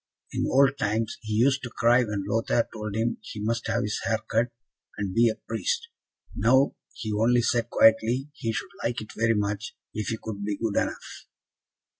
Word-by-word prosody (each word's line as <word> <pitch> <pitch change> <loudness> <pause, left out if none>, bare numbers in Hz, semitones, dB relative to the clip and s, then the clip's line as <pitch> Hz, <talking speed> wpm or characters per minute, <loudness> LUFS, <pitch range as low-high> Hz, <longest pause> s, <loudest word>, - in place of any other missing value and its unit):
In - - 0
old 140 0 +4
times, 110 +2 0
he 110 -1 -4
used 130 +5 +3
to 120 - -5
cry 120 +2 +4
when 105 -3 -3
Lothaire 115 +1 +1
told 105 -2 -5
him 115 +1 0
he 110 - -8
must 115 +3 -1
have 115 +1 0
his 105 - -2
hair 110 - +1
cut, 115 +2 +3 0.5
and 100 -2 -3
be 115 +2 +5
a 110 - -2
priest; 470 -1 -1 0.5
now, 130 +4 +4 0.2
he 110 -2 -4
only 120 +3 +3
said 120 0 +1
quietly, 115 +5 +4
he 115 - -3
should 110 - -4
like 120 +1 -1
it 110 - -9
very 115 +1 +2
much, 105 0 -2 0.2
if 110 0 -3
he 115 - -1
could 100 -2 -6
be 100 -1 -2
good 110 -3 -2
enough. - - -3
115 Hz, 190 wpm, -26 LUFS, 110-120 Hz, 0.5 s, be